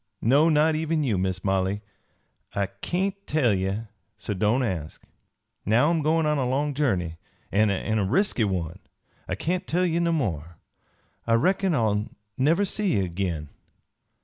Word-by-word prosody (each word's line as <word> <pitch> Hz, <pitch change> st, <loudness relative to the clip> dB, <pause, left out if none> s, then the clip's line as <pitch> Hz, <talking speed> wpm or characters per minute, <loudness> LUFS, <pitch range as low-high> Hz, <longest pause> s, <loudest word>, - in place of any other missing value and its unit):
No, 140 Hz, +8 st, +5 dB
not 155 Hz, +1 st, +4 dB
even 155 Hz, 0 st, 0 dB
you, 110 Hz, -9 st, 0 dB
Miss 95 Hz, -1 st, -2 dB
Molly. 95 Hz, +1 st, 0 dB, 0.7 s
I 100 Hz, -1 st, 0 dB
kain't 195 Hz, +2 st, -2 dB
tell 140 Hz, -8 st, +2 dB
ye, 95 Hz, +2 st, -1 dB, 0.4 s
so 105 Hz, 0 st, -4 dB
don't 105 Hz, +7 st, +1 dB
ask. 85 Hz, -10 st, -4 dB, 0.6 s
"Now 120 Hz, +9 st, +3 dB
I'm 165 Hz, -2 st, +1 dB
goin' 160 Hz, +2 st, +2 dB
on 150 Hz, -1 st, +1 dB
a 125 Hz, -2 st, 0 dB
long 145 Hz, +3 st, 0 dB
journey, 95 Hz, -, 0 dB, 0.3 s
an' 105 Hz, +1 st, +3 dB
a 105 Hz, +2 st, 0 dB
resky 130 Hz, -, +1 dB
one; 90 Hz, -5 st, -3 dB, 0.5 s
I -, -, -2 dB
kain't 180 Hz, +2 st, -2 dB
tell 180 Hz, +2 st, +1 dB
ye 170 Hz, -1 st, +1 dB
no 170 Hz, 0 st, +1 dB
more. 85 Hz, -, -2 dB, 0.7 s
I 115 Hz, -, +4 dB
reckon 185 Hz, +7 st, +2 dB
I'll 110 Hz, -4 st, +1 dB, 0.3 s
never 160 Hz, +9 st, +2 dB
see 200 Hz, -2 st, -1 dB
ye 95 Hz, -, +1 dB
agin. 85 Hz, -4 st, -3 dB
120 Hz, 155 wpm, -25 LUFS, 95-160 Hz, 0.7 s, No